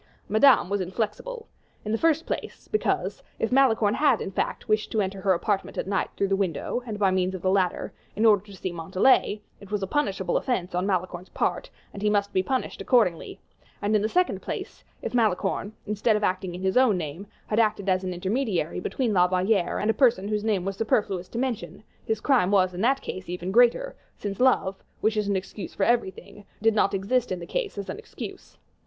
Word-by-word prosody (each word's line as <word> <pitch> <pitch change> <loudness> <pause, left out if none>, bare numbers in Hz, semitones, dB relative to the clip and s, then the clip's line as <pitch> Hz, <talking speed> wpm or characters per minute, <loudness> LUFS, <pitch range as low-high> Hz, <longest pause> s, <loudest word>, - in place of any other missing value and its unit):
Madame 220 +1 +5
was 200 +1 -1
inflexible; 235 - -4 0.4
in 210 - -2
the 225 - +1
first 325 0 +2
place, - - -5
because, 430 - -1 0.2
if 225 - -1
Malicorne 230 -6 +4
had, 280 -4 +3
in - - -4
fact, 195 - -2
wished 215 -1 +1
to 220 - 0
enter 195 -1 -2
her 190 -1 +3
apartment 195 +3 -1
at - - -1
night 195 0 -1
through 200 - +1
the 195 - +2
window, 195 +5 -2
and 215 -2 -4
by 200 -2 +3
means 185 0 0
of 180 - -8
the 185 - +2
ladder, 190 -2 0 0.2
in 220 - +1
order 205 -3 +5
to 210 - -15
see 185 - -3
Montalais, 190 +5 +2 0.2
it 200 - -13
was 205 -1 -2
a - - +1
punishable 195 -5 0
offense 195 -9 -2
on 180 +2 0
Malicorne's 185 -1 -2
part, - - -1 0.2
and 200 - -8
he 210 - +2
must 205 -1 +1
be 185 - +3
punished 260 +7 -2
accordingly; 220 -10 +1 0.4
and, 210 +1 +1
in 210 - +3
the 215 - 0
second 360 +5 +1
place, - - -6 0.2
if - - -4
Malicorne, 215 -3 +1
instead 210 +1 +1
of 210 - -1
acting 185 -2 -1
in 180 - -7
his 190 +4 +1
own 250 -7 +5
name, 165 +4 -5 0.2
had 215 - 0
acted 215 -3 +1
as 185 0 +2
an 185 - -2
intermediary 190 - -1
between 230 +4 -1
La 180 -2 +5
Valliere 185 0 +1
and 210 +2 +2
a - - -2
person 225 -4 +3
whose 210 -1 -1
name 210 -5 +1
it - - -7
was 195 0 -3
superfluous 200 -4 0
to - - -7
mention, 235 -7 -3 0.2
his 220 -1 0
crime 245 -7 +3
was 185 -2 +3
in 180 - -4
that 270 +4 +2
case 185 -1 -6
even 180 +1 -4
greater, 245 - +3 0.2
since 200 -2 -5
love, 220 -7 +2 0.2
which 220 0 +2
is 210 -1 0
an 200 - +1
excuse 190 +1 -5
for 195 - 0
everything, 210 -2 -1 0.2
did 225 +1 +3
not 205 -1 +2
exist 225 +5 0
in 185 - -1
the 170 - -7
case 470 - -3
as 200 - -4
an - - -5
excuse. 450 - -9
205 Hz, 220 wpm, -26 LUFS, 185-225 Hz, 0.4 s, Madame